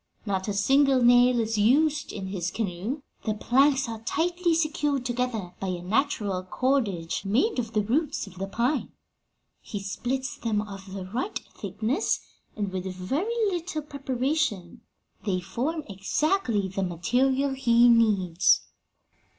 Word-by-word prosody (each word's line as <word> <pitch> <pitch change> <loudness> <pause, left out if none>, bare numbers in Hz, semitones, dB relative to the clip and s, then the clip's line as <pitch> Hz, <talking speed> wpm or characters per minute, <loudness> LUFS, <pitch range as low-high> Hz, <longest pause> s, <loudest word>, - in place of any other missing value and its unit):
Not 190 -2 -1
a 205 - -1
single 265 +5 +4
nail 245 0 +6
is 220 -1 0
used 295 +8 +3
in 190 -2 -5
his 180 -2 -2
canoe: 215 - -3 0.2
the 215 -2 -1
planks 270 +4 +3
are 225 -1 -6
tightly 345 +7 0
secured 295 -4 0
together 240 -7 -2
by 195 - -3
a 180 -1 -3
natural 210 -3 0
cordage 195 -6 -1
made 250 - +1
of 230 -1 -4
the 210 -1 +2
roots 280 +7 0
of 190 -2 -13
the 195 - -2
pine. 240 +7 -1 0.7
He 205 - -6
splits 260 +8 -3
them 220 -3 -1
of 195 -2 -7
the 195 -2 -5
right 245 - -3 0.2
thickness, 250 - -1 0.4
and 205 -3 -2
with 185 0 -3
very 320 - -1
little 340 -3 -3
preparation 270 - -2 0.4
they 190 -4 0
form 280 - -3
exactly 215 - 0
the 195 +1 -3
material 255 +10 +1
he 240 -2 +4
needs.'" 200 -7 +4
235 Hz, 140 wpm, -26 LUFS, 195-280 Hz, 0.7 s, nail